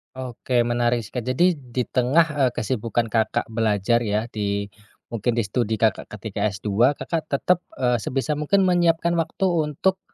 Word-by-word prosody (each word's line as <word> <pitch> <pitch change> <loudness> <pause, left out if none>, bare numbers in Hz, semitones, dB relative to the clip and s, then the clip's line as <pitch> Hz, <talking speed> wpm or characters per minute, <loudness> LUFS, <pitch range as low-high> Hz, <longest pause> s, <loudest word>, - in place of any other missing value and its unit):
Oke, 130 0 -6
menarik 120 0 +1
seka 125 +4 -5
jadi 130 +10 +2 0.2
di 125 - +2
tengah, 130 +8 +3 0.2
eee, - - -1
kesibukan 115 -1 -1
Kakak 110 -1 +1
belajar 110 0 +1
ya, 105 +1 0
di 100 -1 -2 0.4
mungkin 115 +1 -1
di 115 - +1
studi 110 +2 -1
Kakak 110 -2 0
ketika 105 0 -3
S2, 105 +7 +1
Kakak 160 -2 -3
tetep, 175 +6 +1 0.2
eee, 125 -2 +1
sebisa 135 +7 -2
mungkin 195 +6 +2
menyiapkan 170 -2 +2
waktu 165 +4 -1 0.2
untuk, 190 +6 0
120 Hz, 155 wpm, -23 LUFS, 110-145 Hz, 0.4 s, tengah